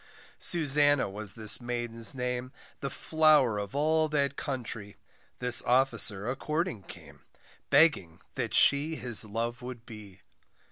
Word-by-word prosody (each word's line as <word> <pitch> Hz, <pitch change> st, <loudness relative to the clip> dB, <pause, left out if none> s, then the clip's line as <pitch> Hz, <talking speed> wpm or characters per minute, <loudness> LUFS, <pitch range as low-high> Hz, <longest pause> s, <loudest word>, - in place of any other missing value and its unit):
Susannah 145 Hz, -, +4 dB
was 100 Hz, 0 st, -7 dB
this 110 Hz, +1 st, -1 dB
maiden's 120 Hz, -1 st, -2 dB
name, 125 Hz, 0 st, -4 dB, 0.3 s
The 140 Hz, -, -4 dB
flower 150 Hz, -7 st, +2 dB
of 100 Hz, +2 st, -7 dB
all 155 Hz, +2 st, +1 dB
that 140 Hz, -2 st, -1 dB
country, 120 Hz, -8 st, -6 dB, 0.4 s
This 125 Hz, -1 st, +1 dB
officer 115 Hz, -5 st, +1 dB
a 125 Hz, -, -2 dB
courting 155 Hz, -, -3 dB
came, 75 Hz, -7 st, -15 dB, 0.4 s
Begging 140 Hz, -, +2 dB
that -, -, -4 dB
she 145 Hz, +3 st, +3 dB
his 120 Hz, -6 st, +2 dB
love 115 Hz, +3 st, -5 dB
would 125 Hz, -2 st, -9 dB
be. 100 Hz, -4 st, -13 dB
125 Hz, 130 wpm, -28 LUFS, 110-145 Hz, 0.4 s, Susannah